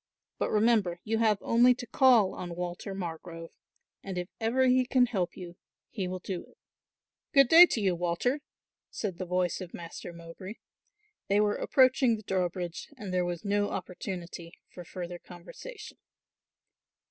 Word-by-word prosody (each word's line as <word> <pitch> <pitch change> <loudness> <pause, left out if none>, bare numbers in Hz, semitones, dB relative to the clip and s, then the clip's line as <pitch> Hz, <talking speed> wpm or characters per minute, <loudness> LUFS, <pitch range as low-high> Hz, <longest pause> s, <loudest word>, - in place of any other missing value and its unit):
But - - 0
remember 210 -5 +2
you 225 +1 -1
have 215 -3 +3
only 245 +2 +4
to 245 - -7
call 240 -5 +4
on 175 -1 -6
Walter 180 +2 -5
Margrove 165 -2 -7 0.5
and 190 -2 -5
if 180 +1 -4
ever 240 +4 +2
he 255 0 +4
can 250 0 +3
help 195 -8 -2
you 175 -2 -9 0.3
he 195 -6 -3
will 185 +1 -4
do 185 -1 -5
it." - - -23 0.8
"Good 275 -2 +7
day 345 +2 +10
to 235 - -1
you, 195 -3 +2
Walter," 175 - 0 0.5
said 190 -5 -5
the 185 - -4
voice 180 +1 0
of 180 -2 -8
Master 170 +1 -8
Mowbray. 170 +4 -10 0.7
They 200 +1 +3
were 210 0 +3
approaching 260 -2 +3
the 215 - -10
drawbridge 180 -2 -3
and 200 -6 -6
there 180 -1 +1
was 175 +2 -4
no 205 0 +1
opportunity 175 -2 -6 0.2
for 180 - -9
further 175 0 -7
conversation. 295 - -11
190 Hz, 160 wpm, -29 LUFS, 175-230 Hz, 0.8 s, day